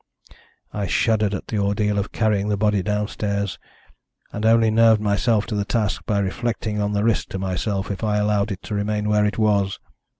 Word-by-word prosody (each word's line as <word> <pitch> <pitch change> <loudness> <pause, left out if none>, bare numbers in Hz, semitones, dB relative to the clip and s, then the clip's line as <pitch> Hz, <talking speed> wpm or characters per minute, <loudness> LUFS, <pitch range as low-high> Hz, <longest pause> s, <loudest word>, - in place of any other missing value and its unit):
"I 100 -2 -2
shuddered 105 0 +1
at - - -6
the 110 - -1
ordeal 100 +1 0
of 100 - -3
carrying 105 -2 0
the 105 - 0
body 105 -1 +2
downstairs, 100 -1 -2 0.7
and 105 +1 -1
only 115 -1 +4
nerved 110 0 +5
myself 105 +1 +1
to 110 - -4
the 100 - 0
task 105 -1 -2
by 105 - +1
reflecting 105 +1 -2
on 105 0 -1
the 100 0 0
risk 115 -1 +1
to - - -4
myself 95 +2 -2
if 100 - -5
I 105 -1 +1
allowed 105 0 +1
it 95 - -6
to - - -6
remain 105 +1 -1
where 105 0 +3
it 105 - -3
was. 100 -3 +1
105 Hz, 195 wpm, -22 LUFS, 100-110 Hz, 0.7 s, nerved